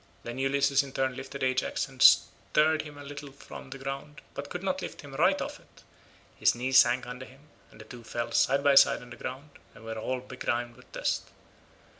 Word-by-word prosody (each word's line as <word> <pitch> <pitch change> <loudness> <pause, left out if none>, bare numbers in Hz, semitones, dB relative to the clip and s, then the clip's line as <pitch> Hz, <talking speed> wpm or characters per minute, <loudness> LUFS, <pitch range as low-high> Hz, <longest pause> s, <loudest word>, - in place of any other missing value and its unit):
Then 120 +2 -6
Ulysses 140 +1 +3
in 140 -1 -9
turn 130 -1 0
lifted 135 +1 -6
Ajax 130 0 0
and - - -12
stirred 155 +1 +5
him 150 -2 -11
a 145 - -9
little 145 0 -8
from 135 -1 -11
the 135 - -7
ground 135 +2 -6
but 140 0 -6
could 180 - -5
not 190 -1 -1
lift - - -7
him 145 -2 -11
right 185 +7 +3
off - - -5
it, - - -22 0.6
his - - +4
knee 125 +2 -2
sank 125 -1 +5
under 125 +1 -8
him, 135 +2 -17 0.3
and - - -18
the 110 - -11
two 120 +1 -11
fell 120 +1 -4
side 140 +1 +3
by 145 -1 +5
side 135 - +6
on 120 - -14
the - - -8
ground 135 +5 -7 0.2
and 115 - -14
were 110 0 -5
all 130 +3 -2
begrimed 120 -2 -3
with 125 - -19
dust. - - -1
135 Hz, 215 wpm, -29 LUFS, 125-140 Hz, 0.6 s, side